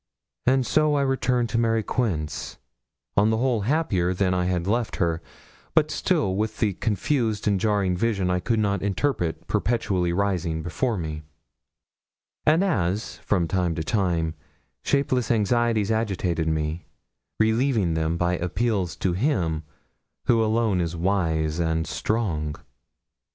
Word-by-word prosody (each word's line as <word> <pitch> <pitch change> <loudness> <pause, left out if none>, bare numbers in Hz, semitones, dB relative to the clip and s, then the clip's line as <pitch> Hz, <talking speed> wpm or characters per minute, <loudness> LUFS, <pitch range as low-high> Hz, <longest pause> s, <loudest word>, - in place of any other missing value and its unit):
And 130 0 +4
so 155 +1 +2
I 140 - +2
returned 125 -3 +1
to 115 - 0
Mary 115 -1 +2
Quince, 90 - -2 0.6
on 105 +2 +4
the 110 - +2
whole 120 -2 +1
happier 100 - +1
than 95 0 +1
I 90 -1 +1
had 90 -1 0
left 115 +3 0
her, 85 -2 0 0.5
but - - +4
still 95 -1 +1
with 110 +2 -2
the 105 -4 +1
confused 110 +2 -1
and 100 -2 +2
jarring 100 -3 +1
vision 100 -2 0
I 90 - +1
could 110 +6 0
not 100 -2 +1
interpret 100 - -1
perpetually 95 -7 0
rising 90 -4 -1
before 110 +7 -1
me; 80 -3 -4 1.3
and 160 +5 +5
as, 100 - -1
from 90 -5 0
time 90 -2 0
to 80 - -2
time, 85 -4 0 0.5
shapeless 140 -3 +1
anxieties 115 -1 +2
agitated 95 -7 0
me, 80 +1 -2 0.5
relieving 110 -4 +2
them 80 +1 0
by 90 +1 +1
appeals 95 0 -1
to 90 -1 -1
Him 90 - 0 0.6
who 115 -2 +4
alone 110 -4 +1
is 85 0 -2
wise 80 -3 0
and 80 -1 0
strong. 85 -10 -1
100 Hz, 140 wpm, -25 LUFS, 85-115 Hz, 1.3 s, and